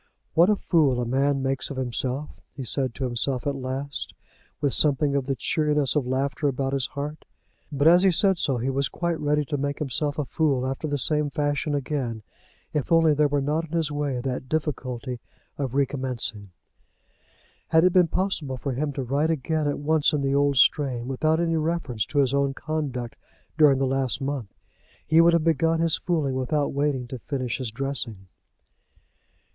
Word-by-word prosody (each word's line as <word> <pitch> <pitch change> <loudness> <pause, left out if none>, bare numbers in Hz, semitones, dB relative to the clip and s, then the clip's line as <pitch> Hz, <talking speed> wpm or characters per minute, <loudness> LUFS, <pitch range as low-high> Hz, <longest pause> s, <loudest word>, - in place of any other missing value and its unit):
"What 170 +4 +5
a 210 - +4
fool 150 -10 +2
a 120 - -1
man 135 +2 +1
makes 135 0 -2
of 140 - -6
himself," 130 +3 -3
he 135 - -5
said 130 -1 +1
to 135 - -4
himself 125 +1 -1
at 145 - 0
last, 135 +2 -5 0.4
with 140 -2 0
something 145 -1 +2
of 135 -2 -1
the 135 - 0
cheeriness 150 -1 +1
of 140 -4 0
laughter 135 +3 -1
about 135 0 -1
his 135 -2 0
heart. 150 +2 -6 0.5
But 145 +1 +2
as 175 +2 +7
he 190 -1 +5
said 190 +1 +3
so 135 -3 +1
he 125 +3 -1
was 135 0 0
quite 170 -2 -2
ready 150 0 +1
to 145 0 -2
make 140 +1 -2
himself 145 +1 -2
a 150 - -1
fool 135 -4 0
after 135 +4 -3
the 145 -1 -1
same 150 +1 +2
fashion 145 0 -1
again, 130 -6 -3 0.5
if 150 0 -2
only 165 -2 +5
there 150 0 +3
were 145 0 0
not 155 +4 0
in 165 - -13
his 160 -3 0
way 145 -3 -2
that 130 0 -4
difficulty 130 -5 -3 0.4
of 135 -2 -3
recommencing. 130 -7 -1 1.2
Had 160 0 +4
it 180 -1 +4
been 180 -2 +5
possible 160 -7 -2
for 135 +2 -3
him 145 +4 -2
to 135 - -3
write 140 +5 0
again 155 0 -1
at 145 - -1
once 155 +1 +2
in 145 -2 0
the 135 0 +1
old 140 -1 +2
strain, 125 -2 +3
without 155 +5 +1
any 165 -1 +1
reference 155 -9 -2
to 145 - -5
his 135 -2 +3
own 140 -1 +1
conduct 140 -7 -4 0.4
during 150 -4 +5
the 135 - +1
last 135 -1 0
month, 135 -7 -4 0.5
he 160 +2 +5
would 170 0 +5
have 170 -2 +3
begun 165 0 +2
his 165 -1 +2
fooling 155 -6 -1
without 135 +3 -1
waiting 140 -3 0
to 130 0 -7
finish 130 -1 -3
his 130 -3 -3
dressing. 115 -5 -4
140 Hz, 190 wpm, -25 LUFS, 130-155 Hz, 1.2 s, as